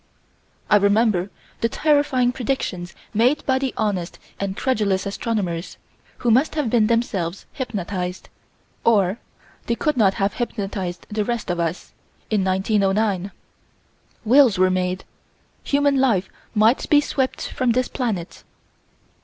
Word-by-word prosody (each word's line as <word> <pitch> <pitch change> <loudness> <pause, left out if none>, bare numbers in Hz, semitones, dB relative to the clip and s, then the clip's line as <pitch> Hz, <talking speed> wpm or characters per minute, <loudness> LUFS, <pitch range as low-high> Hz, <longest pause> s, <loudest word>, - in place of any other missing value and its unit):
I 210 - +6
remember 200 -2 +2 0.3
the 230 - +1
terrifying 285 -5 +2
predictions 225 -9 -3 0.2
made 245 +7 +2
by 265 -1 +2
the 265 -1 -1
honest 195 -5 -2 0.2
and 195 -1 -3
credulous 210 -7 0
astronomers, 200 -5 -3 0.4
who 240 - +1
must 265 +7 +3
have 290 -8 -1
been 225 -3 +4
themselves 200 -6 -1
hypnotized, 185 -7 -4 0.6
or 205 -3 +3 0.5
they 235 - +1
could 300 +2 -1
not 195 -4 +4
have 195 0 0
hypnotized 195 -6 -4
the 210 0 0
rest 235 -4 -2
of 175 - -2
us, 170 +1 -3 0.4
in 210 -3 +2
1909. 195 0 +1 1.0
Wills 245 -3 +5
were 185 0 +4
made. 185 0 -1 0.6
Human 285 0 +2
life 225 -8 +2 0.3
might 220 +4 +3
be 295 - +6
swept 270 -2 -2
from 250 -2 +1
this 255 +1 +1
planet. 210 -10 -4
215 Hz, 130 wpm, -22 LUFS, 190-250 Hz, 1.0 s, I